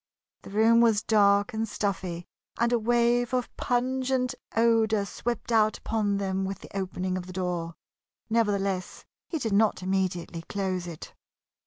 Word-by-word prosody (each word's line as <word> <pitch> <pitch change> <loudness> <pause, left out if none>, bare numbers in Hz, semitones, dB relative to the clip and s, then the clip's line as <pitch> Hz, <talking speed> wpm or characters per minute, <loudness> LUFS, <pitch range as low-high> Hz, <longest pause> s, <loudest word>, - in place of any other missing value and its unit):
The - - -11
room 225 +3 +4
was 220 -3 +3
dark 200 -2 +3
and 220 0 -2
stuffy, 185 -4 -3 0.3
and 235 +1 +2
a 240 - +3
wave 240 +2 +2
of 250 -1 -2
pungent 255 +1 0 0.2
odor 225 -2 +3
swept 240 +3 -4
out 215 -1 +3
upon 205 -3 -1
them 195 -1 -1
with 195 0 -3
the - - -14
opening 185 -1 -2
of 180 - -9
the 185 - -8
door. 175 -2 -3 0.5
Nevertheless, 200 -5 -1 0.2
he 330 - -2
did 225 -8 -2
not 210 -2 +2
immediately 185 -3 -1
close 185 -1 -3
it. 165 -2 -9
205 Hz, 150 wpm, -27 LUFS, 190-230 Hz, 0.5 s, room